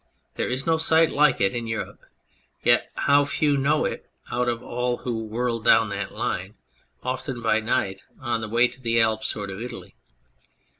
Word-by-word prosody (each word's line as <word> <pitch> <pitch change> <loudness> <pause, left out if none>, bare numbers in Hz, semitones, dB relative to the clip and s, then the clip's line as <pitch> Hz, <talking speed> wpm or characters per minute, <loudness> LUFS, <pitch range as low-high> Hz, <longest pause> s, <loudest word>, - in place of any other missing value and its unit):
There - - -2
is 130 +2 -2
no 160 -1 +2
sight 160 0 +4
like 150 -3 +3
it 95 0 +2
in 120 -1 -3
Europe, 110 0 -4 0.6
yet - - +3
how 145 0 +4
few 145 +1 +1
know 145 +3 +2
it - - -4 0.2
out 120 0 +1
of 120 0 -3
all 125 0 -1
who 115 -3 -4
whirl 115 +2 -1
down 115 0 +4
that 100 0 -4
line 95 +4 -3 0.5
often 130 0 -3
by 110 -2 +2
night 95 -3 -1 0.2
on 120 -3 -2
the 110 - -5
way 120 +2 +4
to 130 - -14
the 115 -1 +1
Alps 110 -1 +1
or 105 - -4
to 95 +3 -6
Italy 125 - -8
120 Hz, 185 wpm, -24 LUFS, 110-130 Hz, 0.6 s, sight